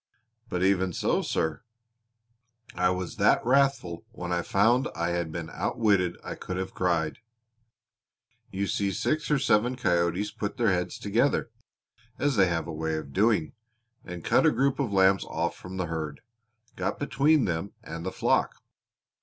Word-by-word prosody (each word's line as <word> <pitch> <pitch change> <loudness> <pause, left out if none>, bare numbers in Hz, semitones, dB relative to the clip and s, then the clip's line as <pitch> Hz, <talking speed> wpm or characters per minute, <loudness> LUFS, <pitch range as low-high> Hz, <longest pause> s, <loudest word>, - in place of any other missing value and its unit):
"But 90 0 -1
even 95 -1 +2
so, - - +1
sir, 80 +5 -1 1.1
I 90 0 +2
was 90 -1 -3
that - - +3
wrathful 130 -9 +2
when 90 -4 -5
I 90 0 +1
found 115 +9 +3
I 85 +1 -1
had 85 -2 -2
been 85 0 -5
outwitted 100 -6 +1
I - - -5
could 90 - -6
have 95 0 -4
cried. 85 -3 0 1.3
You 100 +1 -2
see 100 0 0
six 155 - -1
or 150 - +3
seven 125 -2 +2
coyotes 90 -1 0
put 105 0 -4
their 115 -4 +3
heads 90 -1 -1
together, 115 +4 +1 0.7
as 145 -2 +1
they 95 -3 +5
have 80 -2 -1
a 85 - -6
way 80 0 -2
of 70 -3 -7
doing, 100 -4 +2 0.5
and 90 -2 -8
cut - - +4
a - - +5
group 135 0 +1
of 130 -7 -1
lambs 95 0 +4
off 85 +2 -2
from 95 +1 -9
the 90 - -1
herd 80 -3 -5 0.5
got - - -2
between 145 0 +2
them 85 +2 -3
and 85 +1 -7
the - - -3
flock. - - +1
95 Hz, 160 wpm, -27 LUFS, 85-115 Hz, 1.3 s, they